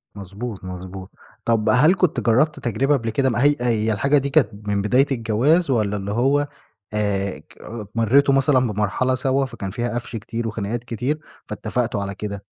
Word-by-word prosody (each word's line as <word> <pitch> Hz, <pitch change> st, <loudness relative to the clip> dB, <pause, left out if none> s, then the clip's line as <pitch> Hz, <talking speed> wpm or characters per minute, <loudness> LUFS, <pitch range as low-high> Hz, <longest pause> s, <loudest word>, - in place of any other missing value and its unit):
مضبوط، 100 Hz, +2 st, -7 dB
مضبوط، 95 Hz, +1 st, -8 dB, 0.3 s
طَب 115 Hz, -2 st, +2 dB
هل 150 Hz, +8 st, +5 dB
كنت 180 Hz, -4 st, +1 dB
جرّبت 140 Hz, +6 st, +2 dB
تجربة 135 Hz, +2 st, +1 dB
قبل 115 Hz, -3 st, -3 dB
كده 130 Hz, +4 st, +1 dB
م 120 Hz, -, -2 dB
هي 145 Hz, +5 st, +4 dB
هي 110 Hz, -3 st, +1 dB
الحاجة 140 Hz, +8 st, +2 dB
دي 140 Hz, 0 st, 0 dB
كانت 140 Hz, -6 st, +3 dB, 0.2 s
من 100 Hz, -1 st, +1 dB
بداية 125 Hz, +7 st, +3 dB
الجواز؟ 130 Hz, +8 st, +2 dB
والَّا 105 Hz, -4 st, +1 dB
اللي 100 Hz, 0 st, -4 dB
هو 135 Hz, +6 st, +2 dB, 0.5 s
آآ، 100 Hz, -2 st, -1 dB
ك -, -, -20 dB, 0.4 s
مريتوا 130 Hz, +5 st, +4 dB
مثلًا 135 Hz, 0 st, +4 dB
بمرحلة 105 Hz, +5 st, 0 dB
سوا 135 Hz, +1 st, +1 dB
فكان 115 Hz, -7 st, -6 dB
فيها 120 Hz, +3 st, -2 dB
قَفْش 120 Hz, 0 st, -4 dB
كتير 115 Hz, +2 st, -4 dB
وخناقات 110 Hz, +1 st, -3 dB
كتير 125 Hz, +6 st, -2 dB, 0.3 s
فاتفّقتوا 120 Hz, -4 st, -2 dB
على 100 Hz, 0 st, -4 dB
كده؟ 100 Hz, 0 st, -6 dB
115 Hz, 170 wpm, -22 LUFS, 105-135 Hz, 0.5 s, هل